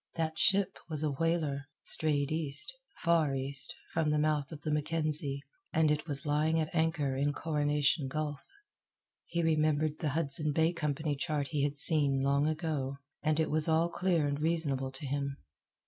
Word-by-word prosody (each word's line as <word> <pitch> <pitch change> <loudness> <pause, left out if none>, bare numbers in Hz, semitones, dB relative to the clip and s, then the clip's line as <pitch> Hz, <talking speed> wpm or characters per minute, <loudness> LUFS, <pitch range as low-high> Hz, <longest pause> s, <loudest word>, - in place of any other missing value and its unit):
That 160 -1 -2
ship 195 -1 +3
was 155 -1 -3
a 150 - +1
whaler, 150 -2 -1 0.2
strayed 145 -2 +3
east, 155 - -2 0.2
far 165 -5 +2
east, 135 +1 -4 0.2
from 160 -2 +1
the 150 - +2
mouth 150 -2 0
of 155 -2 -8
the 155 - -2
Mackenzie, 150 -2 -2 0.3
and 160 -1 +3
it 150 +2 -1
was 145 +1 -3
lying 155 +2 +2
at 155 -1 -2
anchor 160 -5 +1
in 145 +2 0
Coronation 145 -1 +1
Gulf. 150 +1 -3 0.8
He 170 0 -1
remembered 155 -1 +1
the 155 - -1
Hudson 150 -1 +1
Bay 160 +3 +2
Company 150 -2 -1
chart 145 -2 -2
he 140 +1 0
had 145 0 -1
seen 140 -3 +5
long 140 +2 +2
ago, 155 -4 -2 0.2
and 155 0 +1
it 160 - +1
was 155 +1 +2
all 165 +1 +3
clear 175 -4 +1
and 145 +1 -2
reasonable 150 -5 0
to 135 +2 -7
him. 140 0 -2
150 Hz, 170 wpm, -31 LUFS, 140-160 Hz, 0.8 s, seen